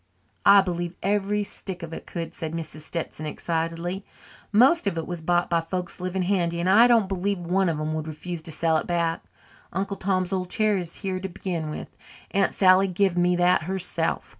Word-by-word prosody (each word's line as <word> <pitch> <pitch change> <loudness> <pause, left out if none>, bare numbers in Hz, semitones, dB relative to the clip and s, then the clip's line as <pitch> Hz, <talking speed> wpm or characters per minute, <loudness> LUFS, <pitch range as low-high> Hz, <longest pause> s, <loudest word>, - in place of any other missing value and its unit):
"I 200 0 +9
believe 175 -2 -3
every 205 +1 +1
stick 190 -3 -6
of 165 -1 -7
it - - -8
could," 165 -1 -5
said 160 -1 -5
Mrs. 155 -2 -6
Stetson 155 -1 -5
excitedly. 165 +4 -3 0.5
"Most 255 +6 +5
of 180 -4 -1
it 165 - -2
was 175 -2 -5
bought 175 +2 +1
by 170 -1 +1
folks 180 +2 -4
living 185 +1 -1
handy 175 -3 0
and 175 - 0
I 220 +6 +7
don't 230 -5 +4
believe 195 +1 -1
one 180 +2 +1
of 160 - -1
them 155 +1 -2
would 155 0 -3
refuse 160 +2 -5
to 160 - -5
sell 160 +1 +2
it - - -3
back. 170 -2 0 0.5
Uncle 195 +2 -2
Tom's 185 -1 0
old 185 -1 -2
chair 215 +1 +2
is 175 -3 -5
here 190 -1 -1
to 190 +1 -5
begin 170 -3 -4
with 150 - -7 0.4
Aunt 195 -1 +1
Sally 190 0 +5
give 190 0 +1
me 180 0 +3
that 175 +1 +3
herself. 180 -3 -1
180 Hz, 200 wpm, -25 LUFS, 165-195 Hz, 0.5 s, I